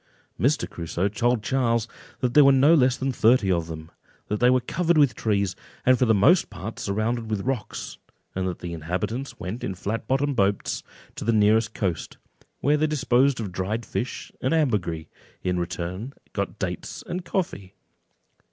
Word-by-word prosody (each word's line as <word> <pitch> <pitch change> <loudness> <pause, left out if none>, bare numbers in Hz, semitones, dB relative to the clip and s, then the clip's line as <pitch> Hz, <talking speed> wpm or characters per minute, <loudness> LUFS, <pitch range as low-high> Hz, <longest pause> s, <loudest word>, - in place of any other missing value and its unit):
Mr. 145 +4 +2
Crusoe 85 +2 -2
told 115 +2 0
Charles 115 -3 +1 0.3
that 125 -2 0
there 150 - +8
were 140 - +7
no 135 +4 +6
less 130 -5 +4
than 135 0 -1
thirty 115 -4 +3
of 85 -2 0
them, 80 0 -8 0.4
that 105 - -1
they 125 - +5
were 130 0 +4
covered 170 +6 0
with 140 -6 +5
trees, 100 -3 0 0.3
and 130 0 +5
for 130 - +4
the 110 - +5
most 170 - +4
part 105 +5 -7
surrounded 115 +1 -1
with 105 -2 -1
rocks; 130 -5 -4 0.3
and 95 0 -1
that 90 - -3
the 85 -1 -6
inhabitants 90 - -3
went 100 +7 -5
in 95 - -3
flat 105 +5 -4
bottomed 140 +1 +1
boats 100 -2 0 0.3
to - - -6
the 115 - +2
nearest 110 +1 +3
coast, 90 -6 -2 0.4
where 145 +1 +3
they 155 +1 +2
disposed 135 -3 +2
of 105 -5 -4
dried 105 +6 -2
fish 125 - -4
and 130 +5 +1
ambergris, 100 - 0 0.4
and - - 0
in 90 - 0
return 90 +8 -4 0.2
got - - -3
dates - - -4
and 180 +1 -4
coffee. 165 - -3
115 Hz, 180 wpm, -25 LUFS, 95-130 Hz, 0.4 s, there